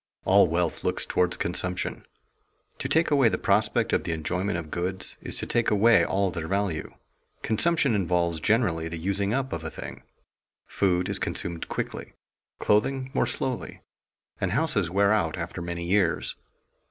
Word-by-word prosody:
_ - - -66 0.2
All 100 0 +6
wealth 85 0 -1
looks - - 0
toward 90 0 +1
consumption. 90 +1 -2 0.7
To - - -3
take 160 0 +2
away 135 -5 +5
the - - -1
prospect - - +1
of - - +2
the 85 - -2
enjoyment 90 +4 -2
of 80 -3 -7
goods 95 +2 -3
is - - -3
to - - -1
take 120 -1 +1
away 110 +3 +5
all 95 -1 +1
their 85 -2 -4
value. 95 -4 -2 0.5
Consumption 140 +3 +2
involves 85 -4 +1
generally 85 -4 +1
the 85 - -5
using 100 +4 0
up 135 +3 -1
of 80 - -4
a 80 - -4
thing. 65 -1 -8 0.6
Food 90 -2 +1
is - - -1
consumed 85 -1 -4
quickly, - - -4 0.4
clothing 130 +5 +1
more - - +2
slowly, 130 -2 -3 0.6
and 95 0 -1
houses 110 - +1
wear 100 +3 +3
out 85 -7 0
after 85 +1 -5
many 85 0 -4
years. 95 +3 +1
95 Hz, 165 wpm, -26 LUFS, 85-110 Hz, 0.7 s, All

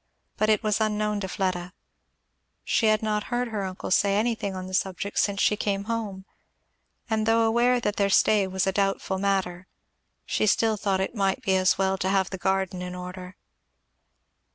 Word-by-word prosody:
But 215 - +1
it 215 -2 +3
was 215 0 +1
unknown 210 -1 0
to 190 - -4
Fleda; 185 -2 -2 0.9
she 225 - +1
had 215 0 +2
not 210 -1 -1
heard 245 0 -2
her 210 -3 -3
uncle 185 -1 -5
say 200 +1 +3
anything 220 -3 -1
on 185 0 -5
the 185 - -9
subject 190 +2 -1
since 200 -1 +1
she 210 - +3
came 200 -1 -2
home; 210 -4 -4 0.8
and 220 -2 0
though 225 0 +4
aware 240 +2 +3
that 210 -3 -2
their 200 -1 +2
stay 200 0 +4
was 190 0 -1
a 190 - +1
doubtful 195 -1 -1
matter, 190 -2 -1 0.6
she 215 - 0
still 220 +2 +3
thought 195 -2 -1
it 190 - -2
might 195 -4 0
be 190 - +2
as 185 0 +3
well 190 0 0
to 190 - 0
have 195 -1 +1
the 190 - -5
garden 190 -1 -1
in 180 0 -5
order. 180 +1 -8
200 Hz, 185 wpm, -26 LUFS, 190-215 Hz, 0.9 s, though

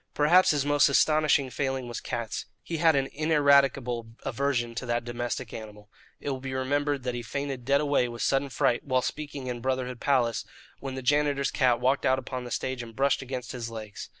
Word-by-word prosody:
Perhaps 170 +5 +5
his 145 -2 +2
most 145 0 +4
astonishing 150 -2 +3
failing 135 -1 -2
was 120 - -5
cats. 115 -2 -4 0.2
He 165 - -4
had 160 -1 +4
an 135 -1 +2
ineradicable 140 -6 +2
aversion 125 -2 -1
to 115 +2 -5
that 120 0 0
domestic 120 0 -4
animal. 105 -2 -10 0.3
It 145 - -3
will 130 - -3
be 130 0 -5
remembered 145 +1 0
that 125 -1 -2
he 120 - -3
fainted 135 +1 -4
dead 140 +2 +3
away 145 -4 +2
with 120 0 -5
sudden 135 +1 +1
fright, 120 -1 +1
while 130 -2 +1
speaking 145 -3 -5
in 125 -2 -4
Brotherhood 130 -1 -2
Palace, 125 -5 +1 0.4
when 135 -1 -5
the 130 - -5
janitor's 145 0 +2
cat 125 -4 +2
walked 135 +2 +1
out 130 0 +3
upon 130 -1 -5
the - - -6
stage 130 +1 -3
and 115 -1 -10
brushed 140 +2 +2
against 130 -1 -5
his 120 -2 -5
legs. 110 -2 -8
130 Hz, 200 wpm, -27 LUFS, 120-140 Hz, 0.4 s, Perhaps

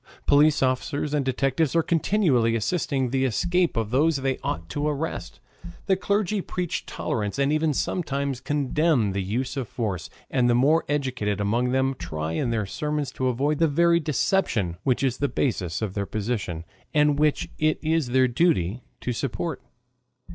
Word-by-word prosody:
Police 150 0 +4
officers 140 +3 -1
and 145 -2 +1
detectives 135 +3 0
are 165 - +4
continually 155 - +2
assisting 130 - -1
the 135 0 +1
escape 175 - +1
of 110 -1 -1
those 150 +5 +3
they 135 -1 -1
ought 85 0 -4
to 145 +1 -2
arrest. 150 +2 -3 0.5
The 195 - +3
clergy 200 +1 0
preach 180 -2 -3
tolerance, 105 0 -3
and 140 +1 +2
even 155 0 +2
sometimes 140 -3 -2
condemn 145 -4 +1
the 100 +1 -2
use 115 +9 -2
of 135 -4 -3
force, 105 -8 -3 0.2
and 125 -2 +2
the 120 - +4
more 150 +7 +3
educated 125 -8 -1
among 115 +5 +1
them 130 +1 +1
try 80 -2 -4
in 80 +9 -1
their 110 -3 0
sermons 150 - -3
to 130 - -2
avoid 140 +4 0
the 165 - +4
very 170 +3 +3
deception 140 - 0
which 130 0 +1
is 130 -2 +1
the 140 - +1
basis 95 - -1
of 100 -4 -3
their 100 -1 -2
position 100 -7 -3 0.3
and 150 -1 +3
which 150 -1 +1
it 155 0 +2
is 160 -3 +1
their 130 +1 +3
duty 120 - +1 0.2
to 125 - -2
support. 140 +4 -3
135 Hz, 170 wpm, -25 LUFS, 115-155 Hz, 0.5 s, Police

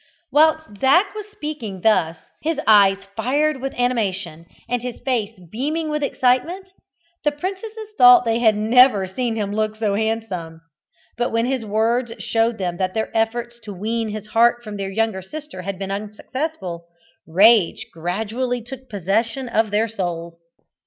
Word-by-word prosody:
Whilst 315 -6 +3
Zac 350 - +4
was 425 -1 -7
speaking 295 - -6
thus, 175 -6 +2 0.2
his 320 -1 -1
eyes 200 -3 +6 0.2
fired 275 +5 0
with 270 0 -4
animation, 195 -9 -1 0.2
and 245 0 -1
his 250 -1 -6
face 230 -6 -2
beaming 305 +7 -2
with 300 0 -1
excitement, 305 +9 0 0.5
the 295 - +3
princesses 395 +7 -6
thought 245 0 +8
they 230 0 +1
had 220 -3 +4
never 220 -1 +5
seen 225 +5 -2
him 205 -2 -2
look 215 0 -1
so 215 -2 -1
handsome. 200 -7 -3 0.6
But 240 - 0
when 230 +1 +1
his 260 -2 -1
words 225 +3 0
showed 225 0 0
them 180 -3 -3
that 185 +1 -2
their 220 - -2
efforts 235 +1 -1
to 210 -4 -9
wean 225 +4 -2
his 210 0 -6
heart 235 +2 +3
from 210 -2 -7
their 195 -1 -3
younger 215 -1 -1
sister 295 +1 -8
had 195 +1 -5
been 195 0 -5
unsuccessful, 205 - -5 0.4
rage 200 +2 +4
gradually 220 +9 -2
took 260 +2 -9
possession 220 +6 -1
of 220 -2 +1
their 210 +2 +1
souls. 170 -5 -4
225 Hz, 155 wpm, -21 LUFS, 200-255 Hz, 0.6 s, thought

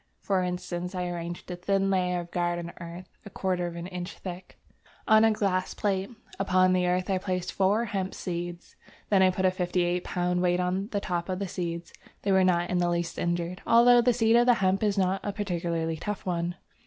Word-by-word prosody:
For 195 -2 0
instance, 180 0 -3
I 180 -1 -2
arranged 175 +1 -6
a - - -3
thin 195 +2 0
layer 180 -1 +1
of 170 0 -11
garden 175 -1 -1
earth 170 +2 -8 0.2
(a - - -9
quarter 180 -2 -1
of 170 - -7
an 170 0 -5
inch 180 0 -6
thick) 180 0 -8 0.5
on 220 0 +6
a 225 - +6
glass 195 -4 0
plate; 195 -1 -1 0.3
upon 185 -1 +3
the 180 -1 +2
earth 180 +1 0
I 190 - +1
placed 185 -1 -3
four 205 +4 +2
hemp 195 -3 -3
seeds; 175 -1 -5 0.4
then 195 -2 +5
I 185 - +6
put 185 +1 -1
a 185 - +5
58 180 -1 0
lb. 180 0 -1
weight 180 0 +2
on 185 +2 -1
the 205 -3 -2
top 175 -1 -3
of 185 - -1
the 200 0 -3
seeds. 170 -1 -5 0.3
They 200 - +1
were 190 -1 +5
not 175 -1 +2
in 180 - +1
the 175 0 +2
least 170 0 -2
injured, 175 +1 -2
although 240 +1 +7
the 245 +1 +4
seed 225 -1 +3
of 240 +1 +4
the 245 - +6
hemp 190 -2 +1
is 210 -2 +1
not 190 0 +1
a 205 - -2
particularly 170 -5 -2
tough 210 +4 -5
one. 175 -1 -1
180 Hz, 215 wpm, -27 LUFS, 175-195 Hz, 0.5 s, although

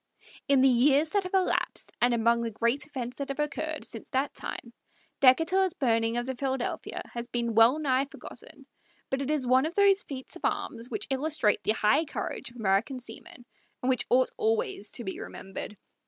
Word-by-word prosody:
In 275 -2 +5
the 270 - +6
years 275 +5 +4
that 405 - +2
have 365 - -2
elapsed, 375 -1 0
and 245 +1 +4
among 235 0 +2
the 230 - -2
great 235 +7 -1
events 255 -4 -6
that 280 -1 -4
have 275 - -4
occurred 310 +1 -2
since 225 - -9
that 270 +2 -1
time, 235 - -7 0.5
Decatur's 325 +8 +4
burning 230 -2 +1
of 240 - -1
the 260 - -3
Philadephia 265 -1 -3
has 235 0 -5
been 235 -1 -2
well 225 +5 +6
nigh 270 -3 +1
forgotten; 280 - -12 0.5
but 270 +1 0
it 275 - -3
is 300 -4 +1
one 260 +4 +4
of 330 - -7
those 400 -1 +5
feats 265 -7 -6
of - - -11
arms 230 +2 -2
which 415 -1 -2
illustrate 270 -5 +1
the 215 - +2
high 220 +9 +3
courage 300 - -4
of 240 - -19
American 220 +4 +1
seamen, 240 0 -11 0.4
and 255 - +1
which 255 - +1
ought 255 +1 +3
always 220 -2 -1
to 240 - -5
be 190 - -5
remembered. 195 +2 -7
255 Hz, 190 wpm, -28 LUFS, 235-295 Hz, 0.5 s, the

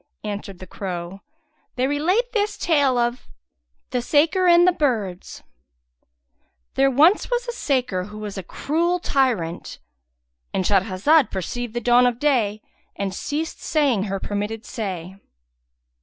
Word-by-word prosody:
Answered 205 -2 -5
the 185 - -10
crow, 180 0 -6 0.5
they 255 - +1
relate 360 - +1
this 425 -2 -1
tale 285 -6 +2
of 240 +1 -1 0.6
The 250 - 0
Saker[FN#169] 320 +8 +3
and 345 +1 +6
the - - +6
Birds. 220 - -2 1.3
There 270 0 +3
was 265 - -5
once 330 +8 +5 0.2
a - - -1
saker 255 - -1
who 210 +1 -10
was 210 -2 -6
a 190 - -4
cruel 335 - -1
tyrant"—And 65 - -3
Shahrazad 205 - +3
perceived 235 +5 -4
the 240 - -1
dawn 245 +2 +5
of 240 -2 -1
day 235 -7 +1 0.3
and 195 -1 -3
ceased 305 +10 -4
saying 275 -10 +1
her 195 -1 -3
permitted 210 +3 -4
say. 190 -4 -5
240 Hz, 130 wpm, -22 LUFS, 195-290 Hz, 1.3 s, and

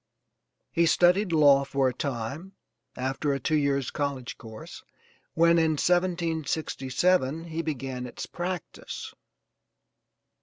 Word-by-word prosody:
He 170 0 +3
studied 180 +4 +4
law 145 -3 +6
for 135 -1 +1
a 130 - 0
time, 140 - -4 0.4
after 135 +3 -1
a 135 - -2
two 145 - -2
years' 140 -3 +1
college 140 -4 -3
course, 110 -1 -10 0.5
when, 170 +1 +5
in 160 -1 +3
1767 165 -3 0
he 165 -1 -4
began 135 -5 -4
its - - -7
practice. 175 -1 -6
150 Hz, 110 wpm, -27 LUFS, 135-170 Hz, 0.5 s, law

